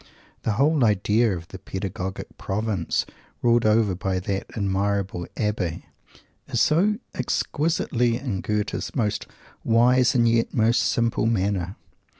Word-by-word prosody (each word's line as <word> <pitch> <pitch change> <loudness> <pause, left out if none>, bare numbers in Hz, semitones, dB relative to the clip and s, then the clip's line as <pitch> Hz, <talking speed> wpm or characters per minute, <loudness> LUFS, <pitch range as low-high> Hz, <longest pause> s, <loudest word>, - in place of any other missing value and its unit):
The 110 - 0
whole 140 +5 +3
idea 105 0 +2
of 85 0 -11
the 95 - -9
"Pedagogic 95 0 -5
Province," 100 -4 -1 0.4
ruled 120 -2 +4
over 110 -2 +3
by 95 +1 -1
that 95 +1 -3
admirable 100 -2 -1
Abbé, 105 -6 -2 0.6
is - - -1
so 195 +7 +3 0.2
exquisitely 125 -3 0
in 120 -8 -3
Goethe's 105 0 -2
most 110 -6 -1 0.4
wise 125 +3 +4
and 120 -1 +4
yet 115 0 +1
most 115 +1 +3
simple 115 -1 +1
manner! 100 -3 0
110 Hz, 125 wpm, -24 LUFS, 95-120 Hz, 0.6 s, ruled